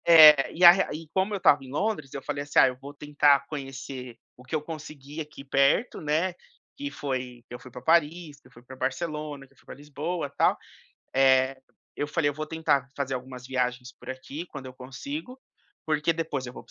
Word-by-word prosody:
É, 155 -4 +9
e 175 - -2
a 170 - +13
re 195 +2 +2
e 165 0 -11
como 190 +2 +1
eu - - 0
estava 155 -7 +4
em 130 - -11
Londres, 155 -4 -2
eu 140 - -5
falei, 145 -1 -3
assim: 145 - -5
"Ah, - - +8
eu 125 - -3
vou 140 +2 -10
tentar 145 -1 +3
conhecer 135 -4 -7 0.2
o 125 - -16
que 130 - -4
eu 155 - 0
conseguir 150 -1 -8
aqui 150 -2 -9
perto", 140 - +2
né, 160 +4 0 0.4
que 285 0 -5
foi 130 - -5
que - - -12
eu - - -9
fui 130 - -12
pra 125 - -9
Paris, 160 -1 +1
que - - -20
eu - - -24
fui 120 -1 -17
pra 130 +2 -11
Barcelona, 150 +2 -4
que - - -28
eu - - -33
fui - - -25
pra - - -9
Lisboa, 150 +2 -4
tal. - - +3 0.6
Eh, 130 0 +4 0.3
eu 145 - -2
falei: 150 0 +1
"Eu - - -4
vou 155 +2 -5
tentar 145 -4 0
fazer 135 -2 -2
algumas 125 0 -7
viagens 125 -1 -2
por - - -14
aqui 130 +5 -6
quando 140 -5 -9
eu 130 - -9
consigo, 255 - -7 0.5
porque 155 +1 +1
depois 155 -5 -3
eu 125 - -8
vou - - -10
para - - -27
145 Hz, 225 wpm, -27 LUFS, 130-160 Hz, 0.6 s, a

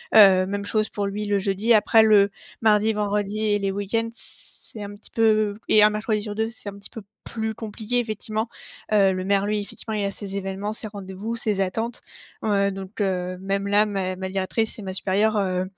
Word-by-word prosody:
Heu, 195 -3 +8
même 200 +1 -3
chose 215 +1 0
pour 205 - -3
lui, 205 +2 -3
le 205 -1 +2
jeudi, 200 +4 +2
après 220 +1 +5
le 205 -2 +5 0.3
mardi, 215 0 +4
vendredi 210 0 -1
et 210 -1 +2
les 195 -1 -1
week-ends, 205 +4 -1
c'est 220 -2 -11
un 200 0 -7
petit 205 - -10
peu 215 -2 +2
et 215 - +6
un 210 - +7
mercredi 215 0 -1
sur 210 -1 -5
2, 220 +1 0
c'est 225 -2 -9
un 200 - -10
petit 200 - -6
peu 225 - -9 0.2
plus 220 -1 -3
compliqué, 220 +2 -3
effectivement. 220 0 -2 0.4
Heu, 200 -3 +4
le 185 0 -3
maire, 200 0 +2
lui, 210 0 0
effectivement, 220 +2 -6
il 210 -1 0
a 200 - -1
ses 200 -1 -5
événements, 195 +2 -3
ses 220 - -5
rendez-vous, 200 +3 -6
ses 210 -3 0
attentes. 225 +6 -2 0.4
Heu, 200 -2 +2
donc, 195 +2 -8
heu, 185 -2 -1
même 195 +1 -1
là 205 +1 +4
mè 190 -3 -2
ma 190 0 -4
directrice 195 +4 -1
et - - -6
ma 190 - -5
supérieure, 205 +3 +1
heu, 185 -2 0
205 Hz, 210 wpm, -24 LUFS, 195-215 Hz, 0.4 s, Heu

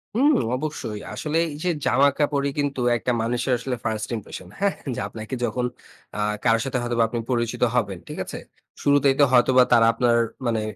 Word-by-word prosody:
হুম, 285 +6 +4 0.2
অবশ্যই। 130 -7 -4
আসলে 155 +1 -2
এই 150 - -6
যে 180 - +1 0.2
জামাকাপড়ই 140 +2 +2
কিন্তু 140 -3 -1 0.2
একটা 125 - -1
মানুষের 120 +3 0
আসলে 125 +1 -3
1st 110 -1 -2
impression 95 -4 -8
হ্যাঁ? 200 0 +2 0.2
যে - - -4
আপনাকে 110 +3 -6
যখন 125 +2 -1 0.5
আ 105 - -1 0.2
কারো 115 -1 +4
সাথে 135 -1 -1
হয়তোবা 120 -1 +1
আপনি 120 +1 -3
পরিচিত 120 -2 -1
হবেন। 100 -7 0
ঠিক - - -7
আছে? - - -7 0.4
শুরুতেই 140 -1 +3
তো - - +7
হয়তোবা 130 0 +5
তারা 115 -1 +6
আপনার 120 0 +2 0.3
মানে 115 -2 0
125 Hz, 175 wpm, -23 LUFS, 115-140 Hz, 0.5 s, তো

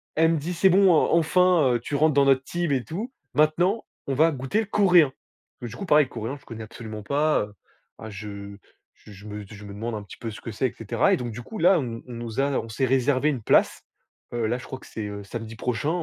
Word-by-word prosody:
elle 160 +1 +4
me - - +1
dit: 160 +5 -3
«C'est 185 +3 +4
bon, 190 +1 +5
en 155 - +3
enfin, 165 -5 +3
tu 145 - -3
rentres 155 +2 +3
dans 140 0 +4
notre 135 -1 +4
team 175 +1 -2
et 130 -3 0
tout. 210 +10 -5 0.2
Maintenant, 165 - +2 0.2
on 140 - 0
va 160 +5 +4
goûter 145 - -1
coréen». 180 -8 +4 0.5
Du 120 -1 -6
coup, 195 - -6
pareil 150 -5 +5
coréen 115 +3 -5
je - - -25
connais 115 -1 -8
absolument 110 -1 -8
pas. 150 +7 +2
Heu, 105 - -5 0.6
je 100 -1 -8 0.4
je 105 0 -14
me 105 0 -7
je 105 +1 -12
me 100 - -9
demande 115 +3 -4
un 105 - -4
petit 100 - -12
peu 115 - -5
ce 105 - -10
que 115 - -6
c'est, 120 +5 0
et - - -8
cetera, 115 -3 +1
et - - +3
donc 120 -2 -4
du 120 +3 -7
coup, 220 - -9
là, 180 +1 +5
on 115 -4 -5
on 125 - -8
nous 120 +1 -5
a 135 - +3 0.2
on 115 - -10
s'est 125 +4 0
réservé 130 +2 +2
une 135 -6 -2
place. - - +3 0.5
Heu, 115 -2 0
là, 120 +3 0
je 125 - -10
crois 130 - -7
que - - -15
c'est, 110 - -6
heu, 100 0 -7
samedi 115 +2 -7
prochain. 125 +5 -2
130 Hz, 245 wpm, -25 LUFS, 110-155 Hz, 0.6 s, bon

